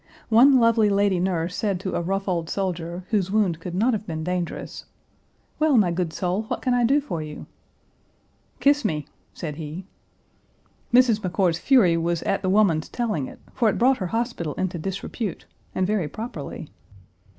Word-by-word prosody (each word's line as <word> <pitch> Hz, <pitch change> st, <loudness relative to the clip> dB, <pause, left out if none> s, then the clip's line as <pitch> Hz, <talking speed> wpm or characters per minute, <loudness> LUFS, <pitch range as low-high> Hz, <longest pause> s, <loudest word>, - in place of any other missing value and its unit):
One 255 Hz, +4 st, +7 dB
lovely 230 Hz, -2 st, +4 dB
lady 200 Hz, -2 st, +2 dB
nurse 180 Hz, -1 st, -1 dB
said 200 Hz, -4 st, -1 dB
to 190 Hz, -, -3 dB
a -, -, 0 dB
rough 195 Hz, +3 st, -2 dB
old 170 Hz, -3 st, -1 dB
soldier, 180 Hz, -2 st, -3 dB
whose 195 Hz, -4 st, +1 dB
wound 195 Hz, -6 st, +1 dB
could 175 Hz, +1 st, -6 dB
not 230 Hz, +6 st, +2 dB
have 210 Hz, -1 st, -3 dB
been 160 Hz, -2 st, -4 dB
dangerous, 180 Hz, 0 st, -4 dB, 0.7 s
"Well, 305 Hz, -4 st, +4 dB
my 190 Hz, -6 st, +4 dB
good 170 Hz, -1 st, -1 dB
soul, 180 Hz, +4 st, -1 dB
what -, -, -4 dB
can 255 Hz, -, +2 dB
I 245 Hz, 0 st, +2 dB
do 275 Hz, +5 st, +4 dB
for 175 Hz, -, -4 dB
you?" 150 Hz, -1 st, -8 dB, 1.1 s
"Kiss 290 Hz, 0 st, +3 dB
me!" 150 Hz, -3 st, -1 dB, 0.3 s
said 150 Hz, -4 st, -6 dB
he. 160 Hz, +3 st, -6 dB, 1.1 s
Mrs. 240 Hz, -3 st, +5 dB
McCord's 180 Hz, -3 st, 0 dB
fury 205 Hz, -12 st, +4 dB
was 170 Hz, 0 st, -1 dB
"at 195 Hz, -, 0 dB
the 190 Hz, -, -1 dB
woman's 185 Hz, -6 st, +3 dB
telling 210 Hz, -, -2 dB
it," -, -, -11 dB, 0.2 s
for 235 Hz, -4 st, +2 dB
it -, -, -1 dB
brought 255 Hz, +2 st, +4 dB
her 185 Hz, -, -2 dB
hospital 225 Hz, -, -2 dB
into 185 Hz, -2 st, -2 dB
disrepute, 195 Hz, +3 st, -4 dB, 0.3 s
and 185 Hz, -, +1 dB
very 200 Hz, -5 st, 0 dB
properly. 160 Hz, -, -7 dB
190 Hz, 175 wpm, -24 LUFS, 170-225 Hz, 1.1 s, One